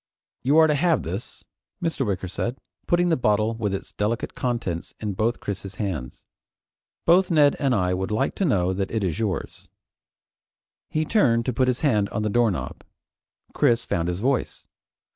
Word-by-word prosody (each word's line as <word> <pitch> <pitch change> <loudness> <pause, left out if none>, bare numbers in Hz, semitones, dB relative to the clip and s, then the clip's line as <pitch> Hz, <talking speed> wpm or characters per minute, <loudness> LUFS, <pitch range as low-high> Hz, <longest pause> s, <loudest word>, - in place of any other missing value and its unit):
"You 140 +5 +3
are 160 - +8
to 155 - +3
have 165 0 +2
this," 95 +7 -6 0.4
Mr. 165 -5 -1
Wicker 95 -2 -2
said, 120 +7 -3 0.3
putting 175 0 +3
the 165 - +4
bottle 110 -2 +1
with 110 -3 -2
its 95 - -5
delicate 110 +3 -2
contents 115 -9 -3
in 105 -2 -3
both 110 +5 0
Chris's 100 -1 -5
hands. 85 - -4 0.8
"Both 180 +2 +5
Ned 150 -4 +4
and 135 -4 +2
I 90 -3 +1
would 95 +1 -2
like 105 +1 0
to 195 - +1
know 95 - +2
that 95 0 -2
it 110 -2 -2
is 90 -1 -1
yours." 100 -7 -3 1.2
He 155 0 0
turned 120 - +3
to 125 - -1
put 130 +3 +2
his 125 -1 0
hand 105 -9 +2
on 105 - -2
the 105 - 0
doorknob. 115 -4 0 0.7
Chris 115 0 +2
found 85 0 -1
his 90 +2 -2
voice. 130 +1 -1
115 Hz, 175 wpm, -24 LUFS, 95-135 Hz, 1.2 s, are